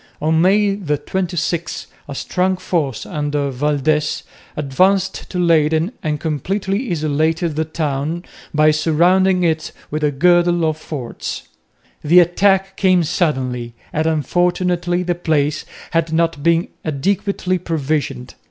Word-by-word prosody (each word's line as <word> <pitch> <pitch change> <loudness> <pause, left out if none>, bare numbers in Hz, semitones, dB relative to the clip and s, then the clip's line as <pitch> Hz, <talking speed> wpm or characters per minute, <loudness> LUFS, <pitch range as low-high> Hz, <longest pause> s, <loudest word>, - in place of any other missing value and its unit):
On 160 +1 +2
May 200 +2 +3
26 170 +1 -2 0.2
a 140 - -6
strong 185 +5 0
force 150 -10 -2
under 145 -1 -2
Valdez 150 +3 0 0.3
advanced 185 +7 +1
to 185 - -5
Leyden 160 0 +2
and 150 -1 -2
completely 195 - -2
isolated 160 0 0
the 160 +1 0
town 155 +1 -2 0.3
by 155 0 +4
surrounding 180 +4 +3
it 160 -2 0 0.2
with 155 +1 -2
a 150 - +3
girdle 175 +3 +3
of 155 -1 0
forts. 140 -6 -6 0.6
The 170 +4 +6
attack 190 +2 +2
came 185 -3 +3
suddenly, 130 -8 -1 0.2
and 155 +1 0
unfortunately 175 +3 0
the 175 0 0
place 155 -4 0 0.3
had 165 -1 0
not 165 -2 +1
been 170 +2 +2
adequately 185 +4 -1
provisioned. 145 -6 -2
160 Hz, 120 wpm, -19 LUFS, 150-180 Hz, 0.6 s, The